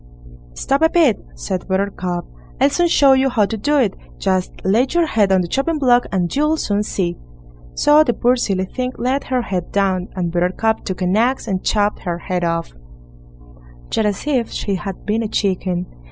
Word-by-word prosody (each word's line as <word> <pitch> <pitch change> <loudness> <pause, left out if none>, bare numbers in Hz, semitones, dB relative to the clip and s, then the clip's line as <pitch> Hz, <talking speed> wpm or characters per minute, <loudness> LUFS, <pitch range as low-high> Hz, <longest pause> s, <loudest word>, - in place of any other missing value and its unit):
"Stop 275 +2 0
a 320 - +5
bit", 315 -11 +3
said 115 - -4
Buttercup; 190 -2 -2 0.3
"I'll - - +4
soon 350 - +2
show 280 -5 +5
you 265 0 +3
how 225 -5 +2
to 225 - -4
do 290 +8 +1
it; 225 -8 +2 0.2
just 185 -1 0
lay 225 +7 +3
your 345 -1 +2
head 210 -9 +1
on 190 -1 +4
the 175 - -3
chopping 275 - 0
block, 245 -4 +3
and 180 -3 -1
you'll 300 +3 +2
soon 205 -7 0
see." 180 -4 -2 0.6
So 300 +1 +5
the 240 -6 0
poor 245 +1 +3
silly 195 -6 -1
thing 255 +5 -4
laid 260 +3 -1
her 255 -1 -1
head 180 -5 -4
down, 190 -2 0
and 175 -3 -2
Buttercup 180 +6 0
took 190 -1 -3
an 180 +2 +1
axe 240 +3 +1
and 190 -3 -2
chopped 205 0 +1
her 175 -2 -3
head 180 0 -3
off, 165 0 -2 1.2
just 220 - +1
as 205 +4 -3
if 260 -6 0
she 200 - -3
had 195 0 -5
been 220 +2 0
a 225 - -2
chicken. 185 -3 -1
205 Hz, 195 wpm, -19 LUFS, 185-255 Hz, 1.2 s, a